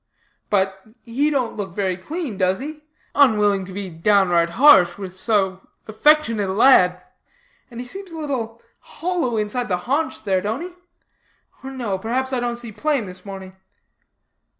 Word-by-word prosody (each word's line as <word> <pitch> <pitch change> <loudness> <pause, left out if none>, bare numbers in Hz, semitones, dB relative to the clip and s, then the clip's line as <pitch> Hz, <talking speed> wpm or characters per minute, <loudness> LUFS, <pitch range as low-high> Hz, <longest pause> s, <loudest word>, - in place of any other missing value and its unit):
'But, 195 -1 0 0.2
he 265 +6 0
don't 260 -6 -1
look 190 -4 -5
very 190 -3 0
clean, 290 - -5
does 185 0 +1
he?' 300 +3 -7 0.3
unwilling 210 -8 +3
to 190 - -10
be 195 +1 -5
downright 175 -1 +2
harsh 205 -11 +6
with 190 -2 -7
so 190 -1 -1 0.2
affectionate 225 -3 +2
a - - -1
lad; 180 -6 +4 0.6
'and 235 -2 -9
he 250 - -5
seems 385 +7 -8
a 325 - -8
little 245 -7 -4 0.2
hollow 335 -10 -2
inside 215 +4 -2
the 180 - 0
haunch 290 +2 -1
there, 190 -3 +1
don't 220 - -3
he? 355 - -5 0.9
or 265 - -6
no, 235 -8 -3
perhaps 260 +5 -2
I 255 - +1
don't 240 0 -2
see 235 -2 -8
plain 285 0 -1
this 185 0 -11
morning.' 190 -1 -9
220 Hz, 160 wpm, -21 LUFS, 190-265 Hz, 0.9 s, harsh